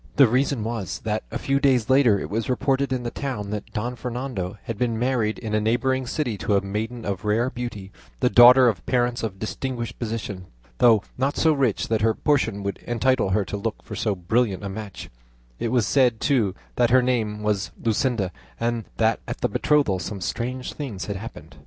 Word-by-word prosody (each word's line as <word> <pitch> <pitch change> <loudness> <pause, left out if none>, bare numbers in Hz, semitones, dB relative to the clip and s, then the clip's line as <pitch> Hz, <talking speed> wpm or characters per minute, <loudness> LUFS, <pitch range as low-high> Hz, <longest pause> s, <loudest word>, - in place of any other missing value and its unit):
The 140 - +7
reason 130 0 +1
was, 110 -5 -3
that - - -1
a - - -3
few 140 0 0
days 130 -5 +3
later 130 -6 +4
it 75 - -4
was 110 +7 -2
reported 135 +1 +1
in 130 -2 -1
the 120 - -3
town 110 -8 -4
that 105 -1 -5
Don 120 +4 -3
Fernando 120 -5 -4
had 115 - -4
been 115 +1 -1
married 120 -3 0
in 110 -3 -5
a 110 - +2
neighbouring 125 +4 +1
city 125 -7 -2
to 105 - +1
a 100 - +3
maiden 110 +4 -4
of 100 -2 -3
rare 115 +4 +1
beauty, 105 -6 -6 0.3
the - - +3
daughter 125 +4 +8
of 100 -8 0
parents 120 -1 +1
of 105 -4 -4
distinguished 120 +2 -4
position, 105 -5 -4 0.3
though 115 -4 +5 0.2
not 135 +2 0
so 160 -1 +4
rich 130 -7 0
that 110 -1 +1
her 110 0 +2
portion 115 -9 +1
would 100 -1 -3
entitle 120 -2 +2
her 95 +1 +1
to - - -5
look 110 +1 -4
for - - -7
so 105 -3 0
brilliant 100 +2 0
a 100 - -3
match; 100 -1 -7 0.5
it - - -1
was 120 -4 +2
said, 120 +1 +3
too, 115 -9 +1 0.2
that 120 -1 +4
her 130 +1 +5
name 110 -4 -1
was 105 -3 0
Luscinda, 115 -4 0 0.3
and 115 -1 -1
that 110 0 +2
at - - -5
the - - +2
betrothal 145 -11 +2
some 95 +3 -5
strange 125 +6 -3
things 125 -11 -5
had 100 - -4
happened." 110 +4 -9
115 Hz, 200 wpm, -24 LUFS, 105-125 Hz, 0.5 s, daughter